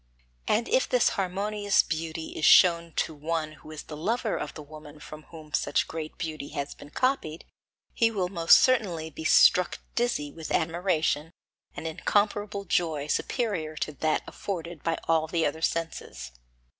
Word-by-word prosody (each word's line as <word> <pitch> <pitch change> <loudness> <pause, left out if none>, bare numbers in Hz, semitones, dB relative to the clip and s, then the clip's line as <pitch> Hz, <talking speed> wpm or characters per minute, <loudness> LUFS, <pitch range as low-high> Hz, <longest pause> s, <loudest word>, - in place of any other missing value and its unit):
And 230 +2 +1
if - - +2
this - - +3
harmonious 200 +2 +1
beauty 160 0 -4
is - - -7
shown 170 0 +6
to 160 - -1
one 155 +1 -3
who 155 - -15
is 155 -1 -8
the 155 - -9
lover 220 +8 -1
of 150 - -5
the 150 - -8
woman 150 0 -12
from 155 0 -11
whom 155 -3 -12
such - - +1
great 160 -1 -6
beauty 155 -4 -5
has 140 0 -3
been 145 - -13
copied, 175 - -1 0.5
he 230 - +3
will 195 -5 -1
most 170 -3 +6
certainly 185 -11 +1
be 160 - -8
struck 180 +2 +5 0.2
dizzy 235 -12 -1
with 160 +1 -8
admiration 165 -2 0 0.5
and - - -6
incomparable 205 +4 0
joy 160 -5 0
superior 165 - -2
to 150 - -3
that 155 +3 0
afforded 170 -5 -6
by 165 -1 -1
all 160 -1 +2
the 165 0 0
other 155 +2 -2
senses. 165 - -3
165 Hz, 160 wpm, -27 LUFS, 155-195 Hz, 0.5 s, shown